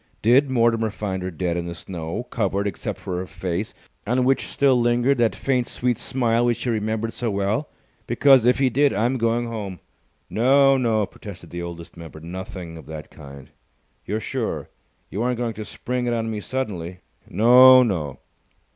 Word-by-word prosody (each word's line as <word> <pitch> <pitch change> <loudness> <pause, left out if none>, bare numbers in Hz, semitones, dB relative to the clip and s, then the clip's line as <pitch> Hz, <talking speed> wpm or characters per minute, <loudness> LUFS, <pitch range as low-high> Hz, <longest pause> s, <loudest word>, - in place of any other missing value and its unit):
Did 130 +5 +5
Mortimer 115 -3 +2
find 100 -2 -4
her 90 - -3
dead 90 0 -2
in 85 0 -3
the 85 - -6
snow, 85 +3 -5
covered 100 -3 -1
except 100 -4 -4
for 90 - -5
her 90 +1 -4
face, 90 +4 -4 0.3
on 125 +3 +2
which 135 +1 +1
still 135 -3 +2
lingered 120 +3 +2
that 115 -2 +2
faint, 130 -3 0
sweet 125 -2 -1
smile 120 -2 0
which 120 -1 0
he 125 - 0
remembered 110 +1 -2
so 120 - -2
well? 100 +8 -1 0.4
Because, 130 0 +5
if 125 - +4
he 135 -2 +2
did, 140 +4 +3
I'm 120 +6 0
going 115 +1 +1
home." 105 -6 -5 0.5
"No, 135 +4 +4
no," 115 -5 +1
protested 95 -4 -11
the 85 - -5
Oldest 85 -1 -8
Member. 80 -2 -10
"Nothing 90 0 -8
of - - -14
that 80 -1 -8
kind." 70 -3 -12 0.5
"You're 105 +3 -2
sure? - - -4 0.4
You 100 - -3
aren't 125 0 0
going 120 -1 -2
to 110 - -6
spring 125 +2 -3
it 120 - +1
on 115 -1 -2
me 110 - -3
suddenly?" 95 -9 -4 0.3
"No, 125 +5 +7
no!" 80 - -2
110 Hz, 180 wpm, -23 LUFS, 90-125 Hz, 0.5 s, No